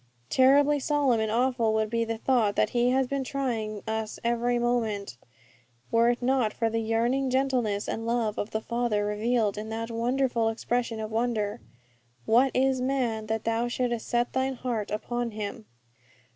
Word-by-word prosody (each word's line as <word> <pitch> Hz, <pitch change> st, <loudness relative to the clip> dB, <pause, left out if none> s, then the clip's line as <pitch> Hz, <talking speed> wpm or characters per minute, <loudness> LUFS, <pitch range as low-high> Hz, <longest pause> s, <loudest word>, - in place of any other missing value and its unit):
_' -, -, -37 dB
Terribly 285 Hz, +3 st, +5 dB
solemn 280 Hz, -4 st, +2 dB
and 220 Hz, -1 st, 0 dB
awful 235 Hz, -2 st, +1 dB
would 220 Hz, 0 st, 0 dB
be 230 Hz, 0 st, +1 dB
the 225 Hz, 0 st, -3 dB
thought 225 Hz, -4 st, +1 dB
that -, -, +2 dB
He 240 Hz, 0 st, +2 dB
has 265 Hz, +1 st, +2 dB
been 275 Hz, +1 st, -2 dB
trying 230 Hz, -7 st, -3 dB
us 220 Hz, -1 st, -3 dB
every 240 Hz, +1 st, +1 dB
moment, 225 Hz, -, -1 dB, 0.8 s
were 230 Hz, +1 st, +4 dB
it 240 Hz, 0 st, -1 dB
not 250 Hz, -4 st, +2 dB
for 225 Hz, -1 st, -1 dB
the 225 Hz, -, 0 dB
yearning 235 Hz, +4 st, +1 dB
gentleness 250 Hz, -6 st, 0 dB
and 225 Hz, -, -3 dB
love 230 Hz, -3 st, 0 dB
of 205 Hz, -, -2 dB
the 220 Hz, -, -2 dB
Father 235 Hz, -3 st, -1 dB
revealed 210 Hz, 0 st, 0 dB
in 215 Hz, +1 st, -6 dB
that 225 Hz, +1 st, -4 dB
wonderful 235 Hz, 0 st, +1 dB
expression 235 Hz, 0 st, -2 dB
of 215 Hz, 0 st, -5 dB
wonder, 220 Hz, -2 st, -1 dB, 0.6 s
'What 250 Hz, +4 st, +4 dB
is 265 Hz, 0 st, +2 dB
man, 245 Hz, -5 st, -1 dB
that 220 Hz, 0 st, -2 dB
Thou 230 Hz, +1 st, 0 dB
shouldest 240 Hz, -1 st, -2 dB
set 240 Hz, 0 st, 0 dB
Thine 260 Hz, 0 st, 0 dB
heart 235 Hz, -5 st, -3 dB
upon 240 Hz, +3 st, -2 dB
him?' 200 Hz, -, -5 dB
235 Hz, 170 wpm, -27 LUFS, 220-250 Hz, 0.8 s, Terribly